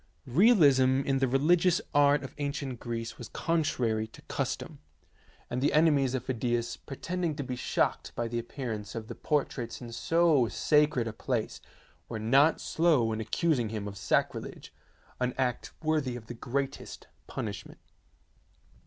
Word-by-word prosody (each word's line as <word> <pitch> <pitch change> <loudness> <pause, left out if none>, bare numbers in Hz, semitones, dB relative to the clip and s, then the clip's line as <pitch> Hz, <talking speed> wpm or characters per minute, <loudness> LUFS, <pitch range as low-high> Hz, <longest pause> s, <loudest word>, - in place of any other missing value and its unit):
Realism 140 - +5
in 135 -1 0
the 135 - +2
religious 170 - +3
art 145 -1 +4
of 135 - -8
ancient 140 -3 -3
Greece 115 -1 -5
was 120 - -8
contrary 125 -10 0
to 110 - -16
custom, - - -4 0.7
and 125 +1 -3
the 145 - +3
ene 160 -1 +5
mies 135 -2 +1
of 130 - -3
Phidias, 120 -2 -1
pretending 170 +3 -4
to 145 - -3
be 125 -1 -4
shocked 125 - -1
by 120 - -1
the 120 +1 -2
appearance 115 -4 -5
of 110 -1 -5
the - - -6
portraits 135 -5 -2
in 120 -2 -8
so 155 +1 +3
sacred 150 -1 +2
a 110 - -4
place, 115 0 -3 0.5
were 115 - -4
not 135 +8 +4
slow 155 -9 +2
in 110 - -3
accusing 120 +1 0
him 105 -2 -4
of 100 - -7
sacrilege, - - -2 0.5
an 125 0 -1
act 125 -2 -1
worthy 155 -5 0
of 120 -2 -8
the 120 - -7
greatest 135 +3 -4 0.2
punishment. - - -6
130 Hz, 155 wpm, -29 LUFS, 120-150 Hz, 0.7 s, Realism